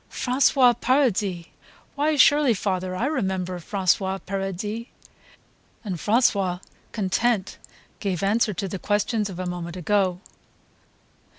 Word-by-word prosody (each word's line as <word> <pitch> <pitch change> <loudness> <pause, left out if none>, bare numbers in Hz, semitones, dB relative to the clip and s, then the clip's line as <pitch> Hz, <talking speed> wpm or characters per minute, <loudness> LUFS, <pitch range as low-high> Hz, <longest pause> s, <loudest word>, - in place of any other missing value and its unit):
"François 255 -1 +3
Paradis!... 215 -9 +1 0.5
Why 300 +2 +1
surely, 285 -3 +5
father, 185 -1 -2
I 225 - -1
remember 190 - -2
François 190 +1 0
Paradis." 195 +4 -4 1.0
And 195 -5 -4
François, 200 -3 +1 0.3
content, 210 0 0 0.4
gave 195 -3 -2
answer 215 +2 +2
to 195 - -3
the 190 0 -5
questions 210 +1 0
of 185 - -8
a 185 - -4
moment 175 -1 -5
ago. 185 0 +1
200 Hz, 110 wpm, -24 LUFS, 185-235 Hz, 1.0 s, surely